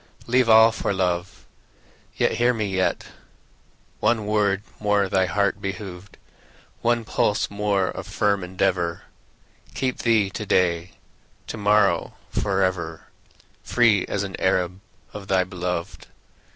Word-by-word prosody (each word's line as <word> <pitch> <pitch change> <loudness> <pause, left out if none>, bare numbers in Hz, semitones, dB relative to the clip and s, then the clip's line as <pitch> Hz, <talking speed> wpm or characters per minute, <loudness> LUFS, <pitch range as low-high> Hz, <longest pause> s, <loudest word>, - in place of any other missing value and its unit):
Leave 125 0 +2
all 110 +1 +8
for 100 -2 -2
love; 90 -1 -2 0.7
Yet, - - +2
hear 120 +1 +2
me, 110 -2 -1
yet, 95 -1 -1 0.9
One 110 -3 +1
word 105 -2 +1 0.2
more 105 -1 +2
thy 95 -1 +1
heart 100 0 0
behoved, 95 -1 -7 0.6
One 120 -1 +1
pulse 105 0 0
more 100 -2 0
of - - -7
firm 100 -2 0
endeavor, 90 -2 -1 0.7
Keep 130 -1 -2
thee 110 -5 +2
to 110 - -5
day, 85 -2 +1 0.5
To - - -6
morrow, 105 -1 +2 0.2
forever, 95 -5 -1 0.5
Free 115 -5 +2
as 100 - -2
an 95 -1 -5
Arab 95 0 0 0.3
Of 100 -2 -8
thy 95 -1 +3
beloved. 90 -1 -5
100 Hz, 125 wpm, -23 LUFS, 95-105 Hz, 0.9 s, all